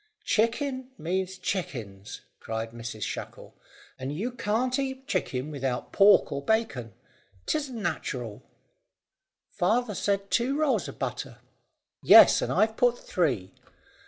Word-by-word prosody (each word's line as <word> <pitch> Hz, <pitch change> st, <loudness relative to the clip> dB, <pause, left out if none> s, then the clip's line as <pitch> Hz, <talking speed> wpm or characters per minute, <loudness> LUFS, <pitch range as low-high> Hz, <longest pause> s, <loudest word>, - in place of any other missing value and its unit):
"Chicken 255 Hz, +4 st, 0 dB
means 185 Hz, +3 st, -2 dB
chickens," 115 Hz, -, -5 dB, 0.2 s
cried 115 Hz, 0 st, -4 dB
Mrs 115 Hz, -2 st, -6 dB
Shackle, -, -, -6 dB, 0.5 s
"and 130 Hz, +2 st, -4 dB
you 205 Hz, +12 st, -3 dB
can't 245 Hz, +2 st, 0 dB
eat 265 Hz, -1 st, -3 dB
chicken 130 Hz, -, -2 dB
without 135 Hz, -3 st, -3 dB
pork 200 Hz, 0 st, +5 dB
or 140 Hz, -, -3 dB
bacon. 140 Hz, -, -1 dB, 0.5 s
'Tisn't 285 Hz, -5 st, -2 dB
natural." 130 Hz, -, -4 dB, 1.1 s
"Father 220 Hz, +5 st, +1 dB
said 200 Hz, 0 st, -1 dB
two 255 Hz, +4 st, +1 dB
rolls 305 Hz, -3 st, +1 dB
of -, -, -9 dB
butter." -, -, -4 dB, 0.6 s
"Yes, -, -, +8 dB
and -, -, -1 dB
I've 220 Hz, 0 st, +2 dB
put 245 Hz, -1 st, +3 dB
three. 125 Hz, -, -1 dB
190 Hz, 120 wpm, -27 LUFS, -, 1.1 s, Yes